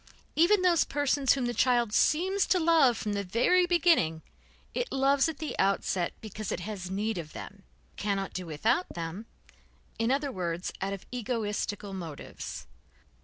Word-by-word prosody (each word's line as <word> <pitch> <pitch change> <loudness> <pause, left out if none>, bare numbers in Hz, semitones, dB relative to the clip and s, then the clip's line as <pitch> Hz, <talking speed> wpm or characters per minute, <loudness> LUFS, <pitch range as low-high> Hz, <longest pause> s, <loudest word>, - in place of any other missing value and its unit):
Even 370 +5 +4
those 345 -3 +4
persons 285 -1 +2
whom 265 -3 -1
the 240 - -1
child 240 -2 +2
seems 375 - +2
to 370 - +3
love 320 -8 +4
from 210 -2 -3
the 200 0 -1
very 300 - +3
beginning, 330 - +3 0.5
it - - -2
loves 275 +2 +3
at 315 - -6
the 310 - -4
outset 190 -2 +1
because 215 -2 -6
it - - -3
has 185 -1 -5
need 210 +1 -1
of 155 -2 -8
them, 100 -5 -9 0.4
cannot 195 -2 -2
do 185 -2 -5
without 225 - 0
them, 170 +6 -5 0.7
in 225 +1 +1
others 280 +1 0
words, 175 -3 -3
out 195 +1 -1
of 195 - -8
egoistical 210 -4 -3
motives. 165 -6 -7
225 Hz, 160 wpm, -29 LUFS, 190-290 Hz, 0.7 s, Even